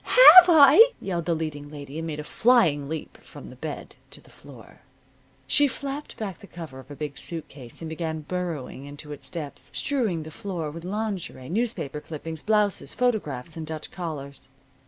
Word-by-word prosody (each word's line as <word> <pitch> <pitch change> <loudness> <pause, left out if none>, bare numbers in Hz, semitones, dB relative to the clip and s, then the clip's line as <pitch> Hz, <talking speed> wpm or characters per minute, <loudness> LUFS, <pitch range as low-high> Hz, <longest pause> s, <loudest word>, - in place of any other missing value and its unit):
"Have 370 -8 +10
I!" 325 - +8
yelled 175 -4 -3
the 170 - +1
leading 150 -2 -5
lady. 145 0 -8
And 165 - -4
made 150 -2 -5
a - - -4
flying 155 - +3
leap 160 0 -6
from - - -12
the - - -12
bed - - -7
to - - -13
the - - -20
floor. - - -15 0.7
She 290 -1 +4
flapped 280 +2 -6
back 200 -4 -5
the 200 - -13
cover 160 -8 -9
of 130 - -14
a 145 - -8
big 145 -2 -6
suit 165 -3 -5
case 130 +2 -10
and 160 - -5
began 160 -1 -4
burrowing 155 -5 -5
into 145 +1 -9
its 145 - -9
depths, 155 -5 -7
strewing 225 - 0
the 160 - -10
floor 180 -8 -5
with 165 +2 -9
lingerie, 195 -9 -4
newspaper 180 - -2
clippings, 160 +1 -6
blouses, 210 -2 +1
photographs 165 - -1
and 160 -1 -6
Dutch 155 -1 -6
collars. 145 -6 -7
165 Hz, 180 wpm, -25 LUFS, 150-210 Hz, 0.7 s, Have